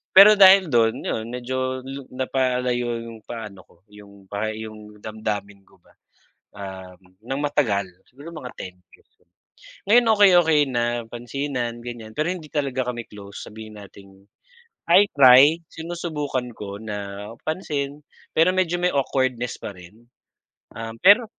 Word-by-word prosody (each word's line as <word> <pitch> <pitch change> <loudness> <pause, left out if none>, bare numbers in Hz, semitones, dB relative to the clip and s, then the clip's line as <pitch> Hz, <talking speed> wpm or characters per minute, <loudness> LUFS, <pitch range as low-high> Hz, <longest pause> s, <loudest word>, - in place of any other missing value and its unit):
pero 205 +2 +10
dahil 190 -2 +7
dun 115 -2 +2
'yun 110 - -3
medyo 130 +1 -3
lu 135 +1 -8
napalayo 125 -2 -1
'yong 115 -1 -10
paano 105 -5 -8
ko - - -24 0.2
'yung 100 -2 -16
pa 105 +2 -2
'yung 105 -1 -10
damdamin 105 -2 -5
ko 90 - -26
ba, - - -26 0.6
um, 95 -2 -9 0.3
nang 135 +2 -2
matagal, 115 -10 +1 0.2
siguro 145 +6 -12
mga 130 -6 -8
10 90 -1 -8 0.2
years. - - -30 0.8
Ngayon 240 +3 +6
okey-okey 175 -7 +5
na, 120 -2 0 0.3
pansinan 120 -1 -4
ganiyan, 115 -2 -8
pero 155 +3 0
hindi 180 -4 -5
talaga 130 -4 -1
kami 120 -1 -7
close, 100 -1 -10
sabihin 110 0 -11
nating, 95 0 -16 0.7
I 195 +4 +7
try, 140 +3 +7
sinusubukan 155 -6 -4
ko 100 -1 -7
na 105 -1 -6 0.2
pansin, 150 -4 -3 0.3
pero 165 +3 +5
medyo 175 -2 +1
may 180 - +3
awkwardness 130 -3 0
pa - - -6
rin. 100 +7 -16 0.7
Um, 115 0 -6
pero 205 +5 +7
125 Hz, 140 wpm, -23 LUFS, 105-145 Hz, 0.8 s, pero